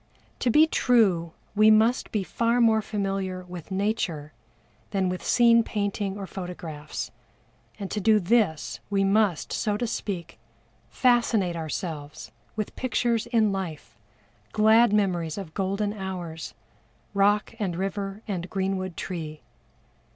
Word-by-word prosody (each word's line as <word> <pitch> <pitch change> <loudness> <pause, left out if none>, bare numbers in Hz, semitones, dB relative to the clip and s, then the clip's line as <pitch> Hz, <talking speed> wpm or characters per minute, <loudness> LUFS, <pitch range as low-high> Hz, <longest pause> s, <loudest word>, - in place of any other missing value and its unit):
To 250 - +1
be 305 +7 +6
true 200 - +2 0.2
we 215 +1 +6
must 220 +3 +3
be 210 -3 0
far 235 +5 +1
more 225 -2 +4
familiar 195 -3 -3
with 180 -2 -9
Nature 190 -7 -2 0.6
than 190 -2 0
with 180 0 -4
scene 235 -1 +5
painting 205 -2 -2
or 200 - -5
photographs, 175 -5 -6 0.7
and 195 -2 -6
to 210 - -2
do 215 +1 +5
this 200 -5 +1
we 200 -1 +2
must, 195 -3 +2
so 210 -1 0
to 240 - -1
speak, 190 - -4 0.5
fascinate 230 -8 +2
ourselves 155 -2 -5 0.2
with 215 -1 -4
pictures 235 -2 0
in 225 -3 +3
life, 185 -6 -5 0.6
glad 220 +1 +5
memories 180 -6 +1
of 185 -6 -7
golden 200 +2 -1
hours, 180 -5 -6 0.6
rock 205 +1 +2
and 190 -5 -1
river 195 +3 -3
and 185 -3 -3
greenwood 190 -2 -2
tree. 155 -4 -5
195 Hz, 130 wpm, -26 LUFS, 180-220 Hz, 0.7 s, be